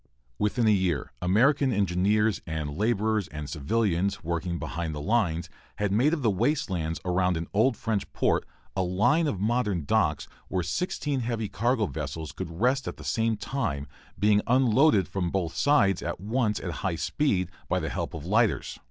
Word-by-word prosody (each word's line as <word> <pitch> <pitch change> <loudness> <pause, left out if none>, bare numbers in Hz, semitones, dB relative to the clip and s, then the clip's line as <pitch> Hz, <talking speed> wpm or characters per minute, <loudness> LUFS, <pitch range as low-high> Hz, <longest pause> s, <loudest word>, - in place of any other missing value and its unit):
Within 115 +3 +1
a - - +6
year 90 -8 0
American 130 +10 +3
engineers 100 +1 +2
and 75 -2 -3
laborers 110 0 +1
and 75 -1 -7
civilians 95 +5 0
working 85 +1 -2
behind 80 +1 -4
the - - -4
lines 90 -3 0 0.3
had 105 -1 -1
made 125 +9 +3
of 160 -5 -1
the 110 - +3
waste 140 +5 0
lands 80 -2 -2
around 90 -1 +1
an 80 - -3
old 115 +4 +3
French 105 -3 -2
port - - +1 0.3
a 95 - +1
line 105 - +2
of 105 -10 -2
modern 105 - 0
docks - - +1 0.2
where 90 -2 -1
sixteen 140 - -2
heavy 115 -3 -2
cargo 120 0 +1
vessels 75 -2 -5
could 80 - -6
rest 130 +2 +2
at - - -5
the - - -10
same 115 -1 0
time, 75 - -3 0.3
being 105 0 +4
unloaded 125 - +4
from 90 -3 -2
both 85 -3 -2
sides 110 -11 +3
at 85 - -4
once 105 +2 0
at 90 - -4
high 95 -3 0
speed, 90 - 0 0.2
by - - +2
the - - -3
help - - -4
of 80 -1 -7
lighters. 110 +3 +1
100 Hz, 175 wpm, -27 LUFS, 85-115 Hz, 0.3 s, a